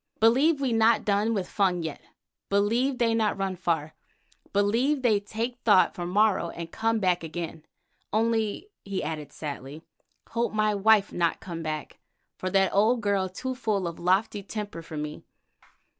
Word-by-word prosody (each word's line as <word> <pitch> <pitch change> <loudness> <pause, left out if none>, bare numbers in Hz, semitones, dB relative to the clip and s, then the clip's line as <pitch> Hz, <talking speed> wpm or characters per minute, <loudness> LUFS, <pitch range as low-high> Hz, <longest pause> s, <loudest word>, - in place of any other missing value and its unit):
Believe 270 +8 +4
we 265 -4 0
not 225 +1 +3
done 210 +2 +2
with 190 -3 -2
Fung 185 -4 +1
yet, 160 -2 -5 0.5
believe 230 +7 +2
they 230 -2 +2
not 220 -3 +1
run 195 -1 -2
far. 165 -4 -1 0.6
Believe 235 +8 +1
they 220 -4 +4
take 225 +4 -4
thought 205 -6 +4
for 175 -1 -5
morrow 200 -2 +2
and 170 0 -7
come 225 0 0
back 180 -3 +1
again. 165 -1 -6 0.4
Only," 225 - 0
he 195 -1 -3
added 155 -2 -5
sadly, 145 +1 -7 0.5
"hope 235 0 -1
my 215 0 +2
wife 205 0 +4
not 170 -1 0
come 170 -3 -6
back, 155 -1 -5 0.4
for 185 - -3
that 195 0 +2
old 225 +4 +3
girl 200 -3 +1
too 255 +8 -4
full 215 -7 -1
of 170 - -6
lofty 190 +4 +1
temper 205 -3 -6
for 165 -1 -8
me. 150 0 -5
200 Hz, 160 wpm, -27 LUFS, 175-225 Hz, 0.6 s, Believe